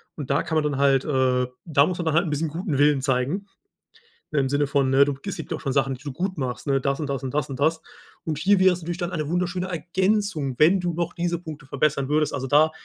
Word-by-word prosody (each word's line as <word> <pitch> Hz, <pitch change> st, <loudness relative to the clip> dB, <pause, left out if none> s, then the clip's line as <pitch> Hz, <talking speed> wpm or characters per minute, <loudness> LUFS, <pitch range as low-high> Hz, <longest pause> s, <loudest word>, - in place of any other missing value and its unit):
Und 145 Hz, -4 st, -7 dB
da 140 Hz, -, +2 dB
kann 160 Hz, -, -3 dB
man 155 Hz, -, +2 dB
dann 150 Hz, -2 st, -1 dB
halt, 135 Hz, -1 st, +3 dB
äh 130 Hz, -3 st, +1 dB, 0.2 s
da 145 Hz, -4 st, +4 dB
muss 180 Hz, -, -2 dB
man 170 Hz, -, -3 dB
dann 160 Hz, -, +1 dB
halt 170 Hz, -, +3 dB
'n 160 Hz, -, -3 dB
bisschen 155 Hz, +2 st, -1 dB
guten 160 Hz, -2 st, -3 dB
Willen 145 Hz, -1 st, +4 dB
zeigen. 135 Hz, +9 st, -1 dB, 0.9 s
Im 135 Hz, -3 st, +2 dB
Sinne 145 Hz, +2 st, +1 dB
von, 135 Hz, -2 st, +1 dB
äh: 140 Hz, +1 st, +7 dB
„Du, 145 Hz, -, -1 dB
es 195 Hz, -, -3 dB
gibt -, -, -7 dB
ja 160 Hz, -, -1 dB
auch -, -, -12 dB
schon 135 Hz, -2 st, -2 dB
Sachen, 135 Hz, -1 st, +1 dB
die 130 Hz, -, -16 dB
du 145 Hz, -, -5 dB
gut 185 Hz, +4 st, -3 dB
machst, 130 Hz, +1 st, -4 dB
ne, 135 Hz, -1 st, +2 dB
das 140 Hz, +2 st, -1 dB
und 150 Hz, -, -3 dB
das 135 Hz, 0 st, -3 dB
und 130 Hz, -, -4 dB
das 145 Hz, -2 st, -1 dB
und 130 Hz, -, -6 dB
das.” 160 Hz, +3 st, +1 dB, 0.4 s
Und 155 Hz, -3 st, -2 dB
hier 190 Hz, +4 st, +3 dB
wäre 185 Hz, 0 st, +6 dB
es 175 Hz, -, -6 dB
natürlich 175 Hz, +1 st, -4 dB
dann 175 Hz, 0 st, -2 dB
eine 155 Hz, -4 st, -3 dB
wunderschöne 180 Hz, +2 st, -1 dB
Ergänzung, 180 Hz, -3 st, 0 dB
wenn 175 Hz, +5 st, +5 dB
du 175 Hz, -1 st, -2 dB
noch 170 Hz, +1 st, -2 dB
diese 170 Hz, 0 st, -1 dB
Punkte 155 Hz, -5 st, -9 dB
verbessern 140 Hz, 0 st, 0 dB
würdest. 150 Hz, 0 st, +2 dB
Also 135 Hz, -2 st, -3 dB
da 150 Hz, +3 st, +5 dB
150 Hz, 270 wpm, -24 LUFS, 140-175 Hz, 0.9 s, äh